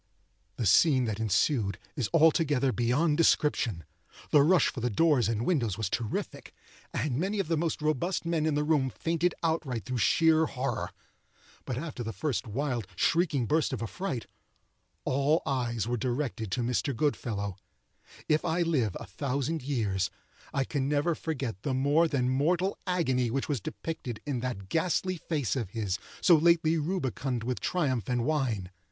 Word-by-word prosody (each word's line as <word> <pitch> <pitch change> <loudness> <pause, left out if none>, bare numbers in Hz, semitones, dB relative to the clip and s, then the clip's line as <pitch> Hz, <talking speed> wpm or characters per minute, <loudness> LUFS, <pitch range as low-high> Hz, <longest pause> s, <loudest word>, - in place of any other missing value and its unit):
The 115 - -1
scene 130 - +5
that 110 -2 -3
ensued 110 - +1 0.2
is 125 -6 -1
altogether 150 -5 +4
beyond 135 +7 +1
description. 135 - +2 0.5
The 145 - +7
rush 175 +5 +5
for - - -6
the 120 +1 0
doors 130 -2 +3
and 115 +1 -1
windows 120 - +1
was 110 -4 -2
terrific, 115 -2 -4 0.4
and 140 -3 -1
many 195 +5 -1
of 195 - -1
the 165 - +2
most 160 -1 -1
robust 155 +5 0
men 165 -2 +1
in 155 - +1
the 150 - +1
room 150 -4 +2
fainted 165 +6 -1
outright 155 -8 -1
through 130 -2 -2
sheer 160 +4 +4
horror. 125 -4 -3 0.8
But 125 - -3
after 145 -3 -5
the 115 -1 -3
first 120 - -2
wild, 120 -2 -2
shrieking 150 - +2
burst 155 +3 +1
of 120 - -3
affright, 130 - -4 0.8
all 140 +5 +2
eyes 120 -5 -1
were 120 0 0
directed 120 -2 -2
to 125 - 0
Mr. 125 +3 0
Goodfellow. 105 -8 -1 0.7
If 155 0 +2
I 170 +1 +1
live 130 - 0
a - - -7
thousand 140 - -2
years, 110 -9 -1 0.4
I 135 - +1
can 135 0 -2
never 150 +3 +2
forget 135 - -4
the 135 +1 -1
more 145 +5 +3
than 135 -5 0
mortal 170 +9 +1
agony 130 -9 +1
which 135 +4 -2
was 140 -7 -1
depicted 125 - -5
in 140 -4 -2
that 120 -6 -4
ghastly 180 - 0
face 150 -6 -2
of 115 -8 -2
his, 100 -3 -2 0.2
so 175 - +7
lately 165 0 +4
rubicund 135 -7 -2
with 125 +1 -2
triumph 130 - -1
and 120 -1 0
wine. 125 - -1
135 Hz, 165 wpm, -29 LUFS, 120-160 Hz, 0.8 s, The